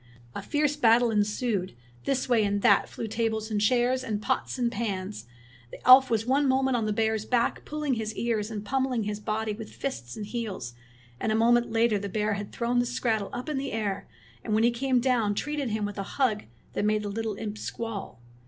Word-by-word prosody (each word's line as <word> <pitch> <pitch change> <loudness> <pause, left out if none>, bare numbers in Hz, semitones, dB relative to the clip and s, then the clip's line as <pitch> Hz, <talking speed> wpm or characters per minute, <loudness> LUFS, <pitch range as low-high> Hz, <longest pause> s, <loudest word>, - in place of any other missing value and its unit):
A - - -5
fierce 295 -1 0
battle 235 -3 +4
ensued. 210 - 0 0.3
This 270 -2 0
way 235 -4 +3
and 205 0 0
that 205 -5 +5
flew - - -5
tables 220 0 -2
and 205 -1 0
chairs, 250 +4 +2
and 215 -4 -2
pots 210 +5 -1
and 240 -2 +1
pans. 200 - -4 0.4
The - - -10
elf 260 +1 +9
was 225 -1 +1
one 275 +3 +2
moment 265 0 +2
on 225 -3 0
the - - 0
bear's 220 0 0
back 235 +1 0
pulling 300 -2 -2
his 220 -2 -3
ears 225 -3 -1
and 210 -2 -5
pummeling 260 -1 0
his 210 0 -3
body 215 0 -2
with 220 +1 -8
fists 130 - -5
and 210 - -4
heels; 210 - -5 0.5
and 220 - 0
a - - +2
moment 235 +2 +4
later 225 -2 +2
the 200 0 -5
bear 210 +1 0
had 205 0 -5
thrown 240 +1 0
the 245 - +1
skrattel 225 -4 -1
up 245 +3 -5
in 300 -3 -1
the 275 - -4
air, 210 -3 -2 0.4
and 215 - 0
when 220 - +3
he 235 - +5
came 255 +1 +1
down 235 -5 +1
treated 295 +1 -2
him 215 -1 -1
with 205 0 -5
a 195 - -5
hug 235 -7 +1 0.3
that - - -1
made 210 0 +1
the - - -3
little 220 +1 -3
imp 215 0 -5
squall. 225 - -5
225 Hz, 215 wpm, -27 LUFS, 210-245 Hz, 0.5 s, elf